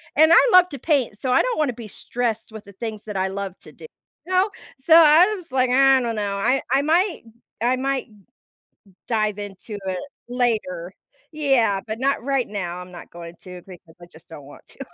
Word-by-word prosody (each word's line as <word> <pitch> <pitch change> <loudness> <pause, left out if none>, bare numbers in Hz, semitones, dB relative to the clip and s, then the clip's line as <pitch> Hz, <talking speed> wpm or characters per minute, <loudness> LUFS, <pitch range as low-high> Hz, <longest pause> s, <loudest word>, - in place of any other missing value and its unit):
And 315 +2 +5
I - - +6
love 365 0 +6
to 280 - -7
paint, 265 -9 0
so 255 +2 -3
I - - +4
don't - - -2
wanna 290 -5 0
be 225 -2 -10
stressed 230 +1 -4
with 220 -2 -10
the 200 - -14
things 220 0 -7
that 210 -2 -5
I 190 0 0
love 195 -1 -6
to - - -14
do, - - -14 0.4
you - - -7
know, 375 +3 +3 0.3
so, 320 +5 +4
I 335 +5 +7
was 350 -8 -11
like, 255 -1 +1
"I 270 0 +5
don't 235 -2 -3
know, 200 -1 -2
I 260 +7 +1
I 270 +1 +3
might 340 - +1 0.4
I 245 +2 +2
might 270 +1 -2
m 215 - -21 0.7
m 190 - -24
dive 215 -3 -1
into 205 +1 -8
it 185 -1 -2 0.3
later, 210 -8 -2 0.4
yeah, 255 -10 +1
but 220 +2 -5
not 275 -2 0
right 275 -2 0
now. 180 -4 -5
I'm 180 0 -10
not 175 - -12
going 170 0 -11
to 180 -1 -11
because 170 -3 -15
I - - -11
just 160 +3 -18
don't 145 -4 -11
want 145 - -15
to," - - -18
230 Hz, 215 wpm, -22 LUFS, 195-275 Hz, 0.7 s, I